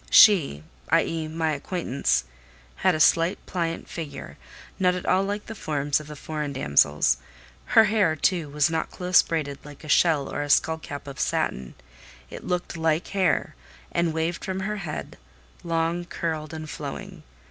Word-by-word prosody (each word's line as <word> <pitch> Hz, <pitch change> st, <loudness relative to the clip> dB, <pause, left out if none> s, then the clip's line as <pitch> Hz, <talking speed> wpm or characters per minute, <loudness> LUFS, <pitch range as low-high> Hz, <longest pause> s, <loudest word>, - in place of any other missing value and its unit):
She 155 Hz, -, +6 dB, 0.3 s
(i.e. 160 Hz, -1 st, +1 dB
my 160 Hz, 0 st, -1 dB
acquaintance) 140 Hz, -, -1 dB, 0.5 s
had -, -, +3 dB
a -, -, -2 dB
slight, 165 Hz, +3 st, +4 dB
pliant 165 Hz, -2 st, -3 dB
figure, 160 Hz, -4 st, -7 dB, 0.4 s
not 180 Hz, -1 st, +3 dB
at 180 Hz, -, -5 dB
all 185 Hz, -, +3 dB
like 205 Hz, +1 st, -3 dB
the 225 Hz, -, -7 dB
forms 145 Hz, -7 st, -1 dB
of 155 Hz, -, -10 dB
the 150 Hz, -, -8 dB
foreign 150 Hz, -1 st, -4 dB
damsels: 70 Hz, -, +3 dB, 0.6 s
her 225 Hz, -, +10 dB
hair, 205 Hz, -6 st, +2 dB
too, 165 Hz, 0 st, 0 dB
was 145 Hz, 0 st, +2 dB
not 160 Hz, -, -1 dB
close 180 Hz, 0 st, +4 dB
braided, 145 Hz, -4 st, -3 dB
like 145 Hz, 0 st, -12 dB
a -, -, -9 dB
shell 155 Hz, -1 st, +3 dB
or -, -, -3 dB
a 145 Hz, -, -4 dB
skull 160 Hz, +2 st, +3 dB
cap 145 Hz, -2 st, -8 dB
of 140 Hz, -1 st, -9 dB
satin; 65 Hz, 0 st, -1 dB, 0.6 s
it -, -, -8 dB
looked 180 Hz, -1 st, -2 dB
like 160 Hz, 0 st, 0 dB
hair, 185 Hz, -7 st, +1 dB, 0.4 s
and 170 Hz, -1 st, +1 dB
waved 160 Hz, +2 st, -2 dB
from 190 Hz, 0 st, -3 dB
her 210 Hz, +2 st, -2 dB
head, 175 Hz, -6 st, -6 dB, 0.4 s
long, 165 Hz, +1 st, -1 dB
curled, 160 Hz, -3 st, -3 dB
and 155 Hz, -1 st, -6 dB
flowing. 150 Hz, -2 st, -7 dB
160 Hz, 165 wpm, -25 LUFS, 145-175 Hz, 0.6 s, her